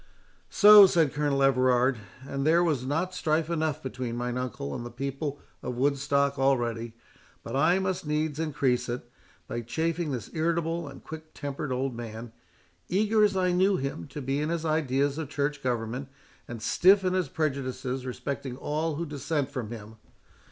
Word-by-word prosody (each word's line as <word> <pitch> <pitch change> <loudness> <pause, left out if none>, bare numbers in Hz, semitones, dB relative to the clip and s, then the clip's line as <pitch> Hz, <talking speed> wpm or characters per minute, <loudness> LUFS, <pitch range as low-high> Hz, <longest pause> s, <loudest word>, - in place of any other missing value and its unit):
"So!" 210 -1 +9
said 165 -6 +2
Colonel 145 -2 +1
Everard, 130 -2 +3 0.3
"and 135 0 -3
there 165 +4 +4
was 145 -7 0
not 165 +6 -1
strife 160 -1 0
enough 155 -3 -1
between 125 -2 -4
mine 120 0 -2
uncle 125 - -4
and 120 - -5
the 120 - -6
people 140 +3 -4 0.2
of 125 - -4
Woodstock 140 +1 +1
already, 120 -4 0 0.5
but 115 - -5
I 160 +6 +4
must 190 -4 -2
needs 150 0 -1
increase 135 -6 0
it, 120 0 -4 0.4
by 120 - -3
chafing 160 +7 -2
this 125 -5 -5
irritable 165 0 -1
and 140 - -11
quick 160 0 -10
tempered 140 -1 -4
old 130 +1 -1
man, 115 0 -7 0.6
eager 210 +3 +3
as 200 -2 +3
I 180 -1 +2
knew 190 +2 +3
him 135 -11 -4
to 145 - -7
be 135 +2 -1
in 150 - -1
his 165 -1 -2
ideas 145 -2 +1
of 155 -4 -4
church 145 -1 -2
government, 125 +1 -2 0.4
and 115 -3 -7
stiff 190 - +5
in 185 - +1
his 185 -6 0
prejudices 135 -4 -2
respecting 130 0 -5
all 155 +2 -2
who 170 +3 -3
dissent 145 -1 -2
from 125 -6 -4
him! 110 -1 -9
140 Hz, 170 wpm, -28 LUFS, 125-160 Hz, 0.6 s, So